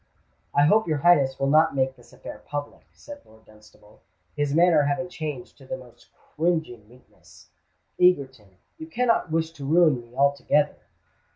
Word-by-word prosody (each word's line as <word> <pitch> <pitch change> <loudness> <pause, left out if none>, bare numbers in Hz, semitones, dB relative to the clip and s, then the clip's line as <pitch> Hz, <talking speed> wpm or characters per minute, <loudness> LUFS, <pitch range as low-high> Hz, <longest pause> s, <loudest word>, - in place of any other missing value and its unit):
"I 145 - +4
hope 215 +6 +3
your 155 -2 0
Highness 140 -4 +3
will 135 0 0
not 155 -1 +3
make 130 0 0
this 120 -2 -21
affair 105 - -11
public," 145 0 -7
said 290 0 -13
Lord 110 0 -22
Dunstable, 105 0 -21 0.3
his 145 -1 -1
manner 165 0 +4
having 145 +5 -2
changed 150 -8 -7
to 135 - -16
the 130 - -5
most 125 -2 -18
cringing 160 -10 -3
meekness. 125 +2 -21 0.5
"Egerton—you 135 - -1
cannot 245 - 0
wish 160 0 -1
to 155 -4 -12
ruin 155 -3 +3
me 120 +1 -19
altogether?" 140 +1 +1
145 Hz, 155 wpm, -24 LUFS, 130-165 Hz, 0.5 s, I